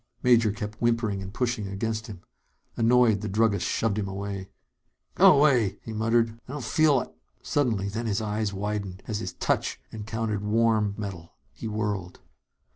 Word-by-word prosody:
Major 115 -3 +5
kept 110 0 -6
whimpering 115 -4 +1
and 95 0 -7
pushing 120 -3 -1
against 110 +3 -3
him. 100 -5 -9 0.5
Annoyed, 115 -3 +4
the 105 - -3
druggist 105 -1 +2
shoved 110 -2 0
him 100 - -2
away. 100 0 -5 0.6
"Go - - +7
'way," 125 -9 +3
he 115 - -6
muttered. 115 +1 +1
"I 130 - -7
don't 145 -3 -5
feel 155 +5 +4
like - - -3 0.2
" - - -40
Suddenly 115 -9 +1
then 115 +3 -3
his 105 -1 0
eyes 105 -1 -1
widened, 100 -1 -4
as 105 -2 -3
his - - -5
touch - - -1
encountered 110 -1 -3
warm 110 -1 +2
metal. 95 -5 -7 0.2
He - - -6
whirled. 105 -4 -3
110 Hz, 165 wpm, -27 LUFS, 100-115 Hz, 0.6 s, Go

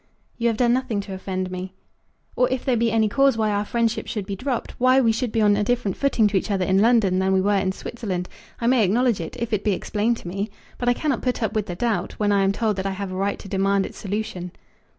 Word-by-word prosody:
"You 235 - +2
have 225 -2 +1
done 240 -1 +3
nothing 250 -5 0
to 195 -1 -8
offend 185 -1 -4
me." 185 +1 -6 0.6
"Or 250 - +3
if 260 -1 -2
there 260 -3 +2
be 230 0 +1
any 220 -1 +3
cause 275 +3 +3
why 215 -1 +1
our 205 0 0
friendship 230 0 -1
should 210 -4 -3
be 200 0 -4
dropped, 255 +4 -3
why 255 +1 +5
we 230 -4 +4
should 230 +1 -2
be 225 - +1
on 205 -1 +5
a 205 - +1
different 240 -3 0
footing 275 -5 +2
to 200 - +1
each 190 - -2
other 195 -3 +1
in 190 +1 +3
London 215 -5 +4
than 190 0 +2
we 190 - +4
were 200 +2 +2
in 190 -1 +1
Switzerland, 190 -3 -4 0.3
I 235 - -3
may 245 -1 +4
acknowledge 230 +1 +2
it, 165 - -6
if 235 -1 -3
it 205 - 0
be 210 - +2
explained 220 +5 0
to - - -10
me. 200 +4 -3 0.3
But 245 - +1
I 245 - +3
cannot 275 -8 -1
put 250 -2 -1
up 220 - -1
with 215 -2 -1
the 175 - -4
doubt, 205 -3 -1
when 205 -1 0
I 200 -1 +3
am 195 - +3
told 215 -1 -1
that 190 +1 -2
I 195 - -2
have 200 -1 -4
a - - -5
right 195 +2 -1
to - - -11
demand 195 0 +1
its - - -9
solution." 190 -3 -4
210 Hz, 270 wpm, -23 LUFS, 195-235 Hz, 0.6 s, why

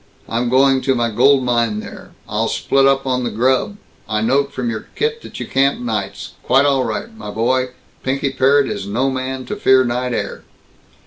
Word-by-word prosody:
I'm 120 +1 -1
going 135 +1 +4
to 135 0 +1
my 120 -1 0
gold 130 +4 +4
mine 120 -3 +1
there. - - -10 0.2
I'll - - -1
split 135 0 +2
up 135 0 +2
on 125 -1 0
the 120 - -1
grub 130 - 0 0.3
I 105 - 0
note 140 +5 +1
from 125 -3 -3
your 110 -2 -4
kit 455 +1 -1
that - - -10
you - - -4
camp 135 +1 +1
nights. 110 -5 -4
Quite 135 +2 +3
all 135 -2 +2
right, 170 - -4
my 220 - -8
boy. 125 +4 +1 0.3
Pinky 135 +1 -1
Parrott 135 +1 +3
is 95 - -4
no 125 +7 0
man 130 0 -4
to 210 - -4
fear 130 -10 +4
night 125 +1 -2
air." - - -4
130 Hz, 195 wpm, -18 LUFS, 120-135 Hz, 0.3 s, going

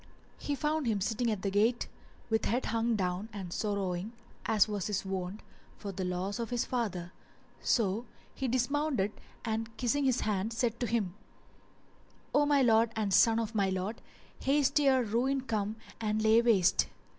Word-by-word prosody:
He 290 - -2
found 300 -1 0
him 215 -3 +1
sitting 230 +4 0
at 210 -4 -2
the 195 - 0
gate 220 +4 +2 0.4
with 220 - +2
head 245 +4 0
hung 230 +1 +1
down 185 +2 -2
and 190 -4 -6
sorrowing, 200 -1 -2 0.3
as 215 -2 +4
was 205 -3 -2
his 200 -2 -2
wont, 190 +1 -4 0.4
for 200 - -5
the 190 0 -4
loss 185 +4 -2
of 230 - -3
his 245 -1 0
father; 190 -8 -3 0.5
so 220 0 +1 0.3
he 265 - -2
dismounted 255 -3 +1 0.3
and 225 0 -3
kissing 270 +3 +1
his 260 -2 +2
hand 210 +1 -1
said 235 0 0
to 245 - 0
him, 215 -7 0 1.2
"O 290 0 +4
my 285 -2 +4
lord 225 -1 +4
and 210 -3 0
son 225 +3 +6
of 225 0 -3
my 200 -3 +2
lord, 190 +4 -3 0.4
haste 280 +1 +3
ere 265 -3 +4
ruin 250 +5 +1
come 215 -4 -2 0.2
and 215 -1 0
lay 220 +1 +6
waste!" 210 -7 +4
220 Hz, 170 wpm, -31 LUFS, 200-245 Hz, 1.2 s, son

